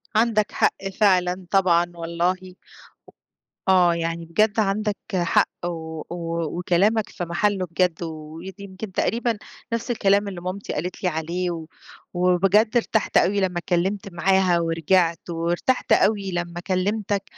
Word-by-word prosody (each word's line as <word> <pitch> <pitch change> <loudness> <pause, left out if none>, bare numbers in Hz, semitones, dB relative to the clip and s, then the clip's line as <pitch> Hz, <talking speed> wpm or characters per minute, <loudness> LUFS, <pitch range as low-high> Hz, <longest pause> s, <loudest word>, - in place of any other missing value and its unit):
عندك 220 -2 +2
حق 195 - 0
فعلًا 185 -2 +3
طبعًا 175 -3 +3
والله. 175 +2 -2 1.1
آه، 180 -2 +5
يعني 165 0 -3
بجد 210 +6 +1
عندك 210 0 0 0.2
حق، 175 -2 +2 0.2
و 160 -2 -5 0.5
وكلامك 200 +5 +2
في 175 - -5
محله 185 +2 0
بجد، 175 0 0
و - - -3 0.3
ودي 190 +3 -9
يمْكِن 195 +1 -8
تقريبًا 230 +4 0 0.4
نَفْس 230 +1 -2
الكلام 200 -2 +2
اللي 185 -3 -6
مامتي 185 +3 -5
قالت 180 +5 -4
لي 180 - +3
عليه، 170 +1 -3 0.5
وبجد 195 +6 +3
ارتحت 220 -2 +1
أوي 200 +2 +3
لمّا 185 -2 0
اتكلمت 190 +3 -1
معاها 185 0 +3
ورجِعت، 165 +1 +1
وارتحت 170 +9 -1
أوي 200 -3 +3
لمّا 175 0 -3
كلمتك، 200 +1 0
185 Hz, 130 wpm, -23 LUFS, 170-200 Hz, 1.1 s, آه